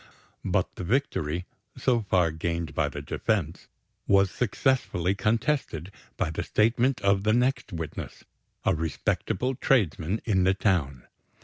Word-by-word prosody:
But - - -1
the - - -4
victory, 90 - -1 0.3
so 120 -3 +2
far 90 -5 +2
gained 85 0 -3
by - - +1
the - - -7
defense, 90 -7 -2 0.4
was 100 -1 +4
successfully 120 -7 +1
contested 105 - -1 0.3
by 80 - 0
the 80 - -3
statement 120 +4 +2
of 100 0 +3
the 110 +1 +3
next 125 0 +1
witness, 80 -4 -6 0.4
a 95 - +4
respectable 85 - -1
tradesman 105 - +1
in 95 -5 +2
the 95 +1 +3
town. 75 - 0
95 Hz, 130 wpm, -27 LUFS, 85-115 Hz, 0.4 s, was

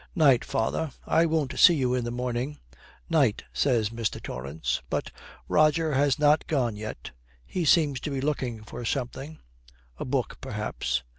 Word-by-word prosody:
'Night, 140 -8 +5
father; 130 +8 -1 0.2
I 165 +1 +3
won't 155 -4 -1
see 175 - +8
you 130 -4 +1
in 125 -2 0
the - - -2
morning.' 125 +4 -3 0.5
''Night,' 145 -10 +2
says 115 -6 +1
Mr. 115 -3 -2
Torrance. 70 +5 -3
But - - -2 0.4
Roger 155 +1 +3
has 140 +1 +2
not 150 +1 +3
gone 125 -8 0
yet. 105 - -7 0.3
He 180 -3 -2
seems 145 -4 +4
to - - -4
be 140 -2 -2
looking 130 -6 -2
for 115 - -8
something 135 +5 -3 0.6
a - - -3
book, - - -2
perhaps. 60 +1 -2
135 Hz, 155 wpm, -27 LUFS, 115-150 Hz, 0.6 s, see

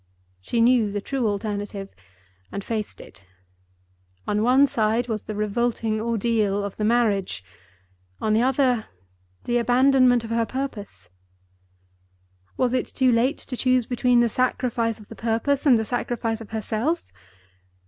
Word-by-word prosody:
She 230 - -1
knew 235 -3 +4
the 205 - -2
true 255 +3 -2
alternative, 205 -1 -4 0.6
and 200 - -5
faced 215 -1 -4
it. 95 0 -14 1.0
On 210 0 +1
one 255 +5 +5
side 230 -1 0
was 220 -3 -3
the 215 - -5
revolting 215 +1 -1
ordeal 220 -3 0
of 200 -1 -6
the 210 - -2
marriage; 210 - +1 0.8
on 215 - 0
the 220 - +3
other, 255 -3 +1 0.6
the 240 0 +1
abandonment 250 0 +4
of 225 - -7
her 230 -1 +1
purpose. 255 - -6 1.5
Was 255 -1 +1
it 255 - 0
too 260 -1 +2
late 245 +5 +2
to 255 - -7
choose 255 -1 +2
between 245 0 +2
the 240 - +3
sacrifice 240 -2 0
of 210 - -14
the 225 - -10
purpose 235 +6 0
and 250 -4 +7
the 220 - -1
sacrifice 230 -1 -2
of 220 - -10
herself? 225 - -2
230 Hz, 145 wpm, -24 LUFS, 215-250 Hz, 1.5 s, and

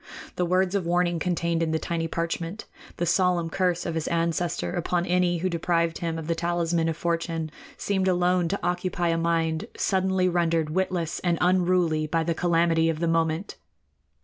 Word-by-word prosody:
The 180 - 0
words 185 +1 +2
of 195 -4 -1
warning 175 -1 +1
contained 170 -1 0
in 165 - +1
the 160 - +1
tiny 165 0 -2
parchment, 165 +4 -3 0.3
the 175 - 0
solemn 175 -1 +2
curse 180 -2 0
of 170 - -2
his 160 -1 -2
ancestor 170 +1 -1
upon 175 0 0
any 180 -1 +2
who 180 +3 -1
deprived 170 -1 0
him 165 -1 -2
of 160 - -5
the 165 - 0
talisman 170 -1 0
of 160 - -3
fortune, 165 -2 -2 0.3
seemed 190 -2 0
alone 180 -1 +2
to 200 +4 -2
occupy 180 -1 -1
a 165 - +1
mind 165 +2 0
suddenly 190 -1 +1
rendered 165 -3 +1
witless 175 -2 -1
and 175 -2 0
unruly 180 -3 +2
by 165 +1 0
the 170 +1 0
calamity 165 -1 +2
of 160 - -1
the 170 +1 -1
moment. 165 +3 0
170 Hz, 175 wpm, -26 LUFS, 165-180 Hz, 0.3 s, words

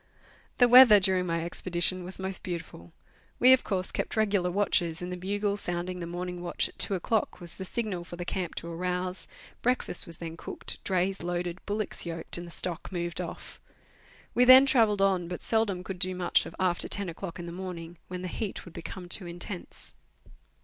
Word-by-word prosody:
The 245 - +6
weather 245 -4 +10
during 185 -1 +1
my 165 0 -1
expedition 175 +1 +1
was 180 +1 -2
most 190 -1 -3
beautiful. 165 - -7 0.5
We, 255 +1 +8
of 260 - +3
course, 185 -2 -2
kept - - -3
regular 200 -4 +2
watches, 175 -3 +1
and 180 0 -5
the - - -3
bugle 200 +3 -1
sounding 180 -1 -3
the 170 - -5
morning 175 +1 -5
watch 175 -1 0
at - - -17
two 200 - +2
o'clock 210 +4 -1
was 175 -1 +1
the 190 - -5
signal 200 -4 -3
for 175 - -9
the 175 0 -6
camp 180 -1 -3
to 170 - -6
arouse; 180 +1 -3 0.3
breakfast 250 -7 +1
was 165 -1 -4
then 165 -1 -7
cooked, - - -5
drays 190 0 0
loaded, 175 0 -3
bullocks 210 0 -2
yoked, 165 0 -1
and 175 - -7
the - - -9
stock 175 +1 -4
moved 175 -2 -3
off. - - -8 0.7
We 245 - +4
then 255 +2 +9
travelled 220 -7 +3
on, 185 -3 +2
but 180 0 -5
seldom 215 -5 0
could 185 -1 -6
do 185 0 0
much 180 -1 +2
after 180 -2 +1
ten 200 -2 0
o'clock 170 +1 -6
in 175 - -6
the 170 - -6
morning, 175 -2 -7
when 180 0 -6
the - - -3
heat 205 +2 -4
would 175 - -12
become 180 +2 -7
too 175 +1 0
intense. 175 +2 -7
180 Hz, 195 wpm, -28 LUFS, 175-195 Hz, 0.7 s, weather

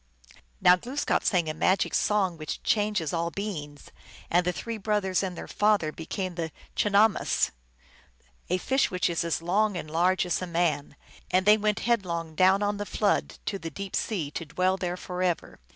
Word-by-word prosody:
Now 180 - +7
Glooskap 255 +10 -1
sang 175 -5 +2
a 155 - -1
magic 185 +5 +1
song, 195 -4 +1
which 155 -2 -6
changes 210 -7 +1
all 170 0 0
beings, 160 -8 -6 0.4
and 175 +1 +4
the 180 - +1
three 225 +8 -5
brothers 205 -3 0
and 185 -3 -4
their - - -7
father 205 -7 +2
became 180 +4 -4
the 165 -2 -4 0.2
chinahmess, 205 +1 +3 1.0
a 180 - +2
fish 265 +8 +1
which 180 -1 0
is 170 - 0
as 165 0 -2
long 200 +3 +1
and 155 -3 -6
large 180 +3 +2
as 175 - -1
a 185 - -3
man, 165 -5 0 0.3
and 185 +1 +2
they 210 +1 +8
went 215 0 0
headlong 170 -9 -1
down 190 +4 +4
on 205 0 0
the 205 - -3
flood, 205 -2 0
to 195 - -2
the 165 - -5
deep 195 +2 -6
sea, 170 -10 -2
to 165 - -5
dwell 185 +5 +1
there 180 -1 -3
forever. 180 -1 -2
185 Hz, 180 wpm, -27 LUFS, 170-205 Hz, 1.0 s, they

